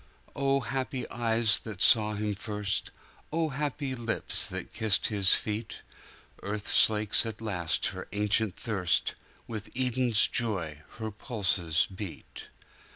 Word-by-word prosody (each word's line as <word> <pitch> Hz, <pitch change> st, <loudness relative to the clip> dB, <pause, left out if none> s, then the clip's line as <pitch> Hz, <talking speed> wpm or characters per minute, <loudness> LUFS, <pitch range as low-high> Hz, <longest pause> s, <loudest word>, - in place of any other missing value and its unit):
O 140 Hz, 0 st, +1 dB
happy 130 Hz, +2 st, -4 dB
eyes 115 Hz, -2 st, +2 dB
that 110 Hz, -5 st, -9 dB
saw 105 Hz, 0 st, +5 dB
Him 105 Hz, 0 st, -2 dB
first; 105 Hz, -1 st, -3 dB, 0.4 s
O 160 Hz, 0 st, 0 dB
happy 145 Hz, -1 st, -3 dB
lips 115 Hz, -3 st, +4 dB
that -, -, -7 dB
kissed 110 Hz, -3 st, +1 dB
His 100 Hz, -3 st, +5 dB
feet:Earth 105 Hz, -1 st, -7 dB
slakes 105 Hz, -1 st, +4 dB
at 110 Hz, -2 st, -6 dB
last 90 Hz, -7 st, -1 dB
her 95 Hz, -, -8 dB
ancient 105 Hz, 0 st, +1 dB
thirst; 95 Hz, -6 st, -1 dB, 0.3 s
With 110 Hz, -3 st, -7 dB
Eden's 125 Hz, -3 st, +3 dB
joy 95 Hz, -, -2 dB, 0.2 s
her 110 Hz, -1 st, -5 dB
pulses 95 Hz, -, 0 dB
beat. 95 Hz, -2 st, -9 dB
110 Hz, 120 wpm, -28 LUFS, 100-120 Hz, 0.4 s, saw